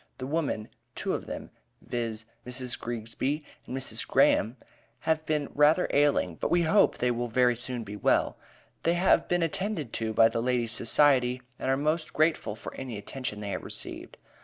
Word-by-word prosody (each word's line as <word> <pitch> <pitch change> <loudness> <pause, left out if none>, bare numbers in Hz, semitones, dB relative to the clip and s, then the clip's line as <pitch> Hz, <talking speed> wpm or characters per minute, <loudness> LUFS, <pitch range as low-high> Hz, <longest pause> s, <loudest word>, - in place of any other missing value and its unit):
The 130 - -5
women, 140 -7 -2 0.3
two - - -1
of - - -4
them, - - -6 0.3
viz: 115 -2 -3 0.2
Mrs. 125 0 -2
Greegsby 120 +6 -2 0.2
and 130 - -4
Mrs. 130 - -1
Graham, 115 +4 +3 0.4
have 160 -1 +1
been 150 -2 0
rather 150 +5 +4
ailing, 140 - +2
but - - -1
we 175 0 +3
hope 200 +6 +4
they 125 0 +1
will 120 0 -2
very 125 +1 +3
soon 125 0 -4
be 105 -1 -7
well. 105 - +2 0.5
They 170 +1 +2
have 180 +2 +3
been 175 -1 +2
attended 165 - -2
to 110 -1 -1
by 115 +1 +6
the 115 - -2
Ladies' 120 -2 0
Society, 125 +1 +2 0.2
and - - -2
are 135 - +3
most 155 +3 -1
grateful 155 -8 +1
for - - -8
any 125 -5 -6
attention 105 0 -4
they 100 -1 -4
have - - -4
received. - - -6
125 Hz, 180 wpm, -28 LUFS, 115-155 Hz, 0.5 s, by